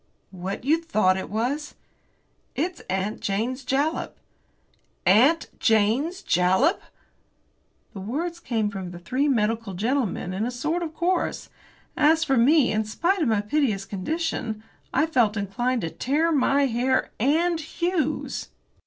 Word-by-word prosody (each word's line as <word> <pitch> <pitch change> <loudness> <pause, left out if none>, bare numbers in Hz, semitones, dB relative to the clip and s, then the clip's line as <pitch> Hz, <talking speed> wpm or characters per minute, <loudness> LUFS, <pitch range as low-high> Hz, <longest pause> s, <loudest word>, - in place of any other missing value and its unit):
"What 190 +3 -5
you 315 +5 +2
thought 215 - +2
it 190 - -5
was?" 255 +8 -2 0.8
"It's 350 +4 -2
'Aunt 190 +3 -2
Jane's 235 +7 -2
Jalap.'" 280 +5 -1 0.9
"'Aunt 255 - +4
Jane's 230 - +2
Jalap!'" 185 - +2 1.1
The 200 - -7
words 320 - -3
came 225 -9 -1
from 190 -2 -5
the 175 - -9
three 255 +11 -1
medical 225 -5 0
gentlemen 220 -3 -1
in 195 +3 -2
a 240 - 0
sort 305 +8 -2
of 320 -2 -5
chorus. 355 +1 -1 0.4
As 320 +2 +4
for 270 -5 +1
me, 265 +3 +4
in 220 0 +1
spite 340 - 0
of 305 - +2
my 220 -3 +2
piteous 210 -4 0
condition, 220 - -3 0.3
I 310 - +2
felt 235 -9 +2
inclined 235 +5 -1
to 165 - -3
tear 310 +6 0
my 280 -1 +3
hair 260 +1 0
and 320 +7 +2
Hughes's! 320 -2 -2
255 Hz, 135 wpm, -25 LUFS, 210-310 Hz, 1.1 s, Aunt